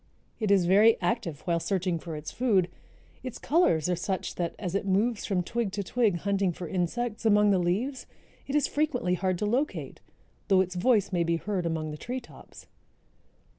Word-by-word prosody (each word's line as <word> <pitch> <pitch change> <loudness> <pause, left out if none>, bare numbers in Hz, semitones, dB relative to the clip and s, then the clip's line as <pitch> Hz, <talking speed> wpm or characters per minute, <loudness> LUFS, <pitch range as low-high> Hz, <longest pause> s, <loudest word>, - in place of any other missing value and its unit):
It 215 -3 -1
is 195 -3 +4
very 210 +5 +5
active 170 - -2
while 170 -2 0
searching 185 -1 -1
for 165 -1 -7
its 150 0 -6
food. 205 -8 +2 0.5
Its 255 -2 -6
colors 245 - +2
are 180 - +1
such 185 +2 -3
that, 170 -2 -3
as 180 -4 -4
it 200 0 -1
moves 205 +4 +1
from 185 -3 0
twig 230 +1 -2
to 205 - -2
twig 220 -1 +1
hunting 195 0 0
for 175 +1 -7
insects 210 +7 -2
among 210 -2 +4
the 190 - +3
leaves, 210 +11 -1 0.4
it 280 - -2
is 295 - +3
frequently 290 - 0
hard 185 0 0
to 210 - -2
locate 255 +8 -2 0.5
though 190 -2 +5
its 185 -1 -2
voice 200 +2 +2
may 175 -1 +2
be 170 0 +1
heard 185 -1 -2
among 160 -2 -2
the 150 - -6
tree 250 +10 -4
tops. 240 - -15
195 Hz, 190 wpm, -28 LUFS, 175-230 Hz, 0.5 s, very